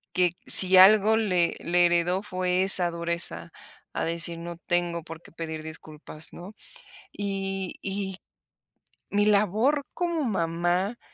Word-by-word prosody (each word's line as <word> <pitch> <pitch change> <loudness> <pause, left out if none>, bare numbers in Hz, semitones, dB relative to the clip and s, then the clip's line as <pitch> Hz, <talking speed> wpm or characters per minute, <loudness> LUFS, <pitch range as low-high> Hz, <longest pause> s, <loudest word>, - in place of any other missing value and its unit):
que 180 -2 +1
si 185 0 +8
algo 210 +3 +5
le 185 -6 -1
le 175 0 +1
heredó 175 +2 -1
fue 185 -2 -3
esa 185 -2 +5
dureza 170 - -2 0.4
a - - -3
decir 170 0 -4
no 170 0 -9
tengo 175 -1 -3
por 165 0 -11
qué - - -18
pedir 160 -1 -8
disculpas, 155 0 -11
¿no? 185 +4 -12 0.6
Y 195 -2 -5
y 195 -1 -5 0.9
mi 205 0 0
labor 215 +8 0
como 340 -4 -3
mamá, 175 +2 -2
180 Hz, 130 wpm, -24 LUFS, 170-200 Hz, 0.9 s, si